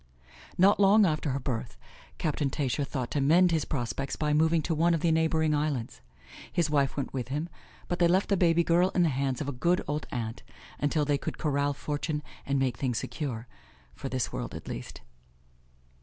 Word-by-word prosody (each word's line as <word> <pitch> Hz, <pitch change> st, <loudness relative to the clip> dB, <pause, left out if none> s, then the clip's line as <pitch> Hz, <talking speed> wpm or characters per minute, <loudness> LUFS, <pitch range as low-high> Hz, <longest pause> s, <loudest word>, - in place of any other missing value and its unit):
Not 195 Hz, +3 st, +5 dB
long 205 Hz, +1 st, +6 dB
after 155 Hz, -3 st, 0 dB
her 135 Hz, +1 st, -1 dB
birth, 125 Hz, -3 st, -4 dB, 0.4 s
Captain 150 Hz, -3 st, -1 dB
Tascher 140 Hz, +1 st, -1 dB
thought 130 Hz, -3 st, -4 dB
to 145 Hz, -, 0 dB
mend 170 Hz, +6 st, +5 dB
his 160 Hz, -3 st, +1 dB
prospects 135 Hz, 0 st, -3 dB
by 150 Hz, -1 st, 0 dB
moving 160 Hz, +1 st, +3 dB
to 165 Hz, -, -1 dB
one 165 Hz, +2 st, +3 dB
of 160 Hz, -, -3 dB
the 170 Hz, -, +3 dB
neighboring 160 Hz, -1 st, +2 dB
islands. 145 Hz, -, -2 dB, 0.5 s
His 165 Hz, -3 st, 0 dB
wife 140 Hz, -2 st, +1 dB
went 140 Hz, -, -3 dB
with 125 Hz, -3 st, -3 dB
him, 150 Hz, +6 st, -3 dB, 0.4 s
but 175 Hz, -, -2 dB
they 175 Hz, -, +5 dB
left 185 Hz, +3 st, +2 dB
the 200 Hz, -, +4 dB
baby 170 Hz, -2 st, +3 dB
girl 175 Hz, +2 st, +3 dB
in 180 Hz, -, +4 dB
the 165 Hz, -, +3 dB
hands 135 Hz, -1 st, -1 dB
of 145 Hz, -, -3 dB
a -, -, -1 dB
good 170 Hz, +8 st, +1 dB
old 150 Hz, +1 st, -2 dB
aunt, 115 Hz, 0 st, -4 dB, 0.4 s
until 145 Hz, +1 st, +1 dB
they 145 Hz, -1 st, +1 dB
could -, -, -5 dB
corral 145 Hz, -1 st, 0 dB
fortune 150 Hz, +1 st, -3 dB, 0.2 s
and 140 Hz, 0 st, +1 dB
make 130 Hz, -3 st, 0 dB
things 125 Hz, -2 st, -1 dB
secure, 125 Hz, -6 st, -4 dB, 0.5 s
for 135 Hz, -, -6 dB
this 130 Hz, -2 st, -2 dB
world -, -, -4 dB
at -, -, -9 dB
least. -, -, -7 dB
150 Hz, 200 wpm, -28 LUFS, 135-165 Hz, 0.5 s, long